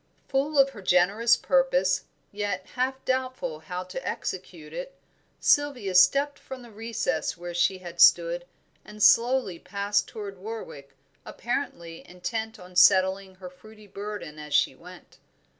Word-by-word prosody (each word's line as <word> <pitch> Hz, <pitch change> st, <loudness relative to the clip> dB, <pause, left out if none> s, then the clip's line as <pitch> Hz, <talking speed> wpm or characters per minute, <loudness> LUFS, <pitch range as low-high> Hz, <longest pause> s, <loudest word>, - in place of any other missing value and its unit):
Full 285 Hz, +3 st, 0 dB
of 275 Hz, 0 st, +5 dB
her 210 Hz, -, -11 dB
generous 195 Hz, +6 st, +3 dB
purpose, 190 Hz, -9 st, +1 dB, 0.3 s
yet 205 Hz, -3 st, -3 dB
half 265 Hz, +1 st, -2 dB
doubtful 255 Hz, -11 st, -2 dB
how 180 Hz, +2 st, -6 dB
to 185 Hz, +9 st, -7 dB
execute -, -, -6 dB
it, -, -, -7 dB, 0.4 s
Sylvia 265 Hz, -10 st, +2 dB
stepped 275 Hz, +11 st, +4 dB
from 260 Hz, -1 st, -9 dB
the 235 Hz, -, -14 dB
recess 210 Hz, -8 st, -2 dB
where 175 Hz, 0 st, -7 dB
she 175 Hz, +2 st, +2 dB
had 175 Hz, -2 st, -6 dB
stood, 170 Hz, 0 st, +5 dB, 0.4 s
and 210 Hz, 0 st, -5 dB
slowly 235 Hz, -7 st, +4 dB
passed 200 Hz, +1 st, -1 dB
toward 200 Hz, -3 st, -8 dB
Warwick, 180 Hz, -10 st, -8 dB, 0.3 s
apparently 240 Hz, -10 st, -5 dB
intent 220 Hz, +5 st, -5 dB
on 180 Hz, -2 st, -14 dB
settling 190 Hz, +1 st, +4 dB
her 185 Hz, -1 st, -10 dB
fruity 215 Hz, +4 st, -16 dB
burden 200 Hz, -6 st, -7 dB
as 150 Hz, -1 st, -4 dB
she -, -, +3 dB
went. -, -, -15 dB
200 Hz, 140 wpm, -26 LUFS, 180-245 Hz, 0.4 s, of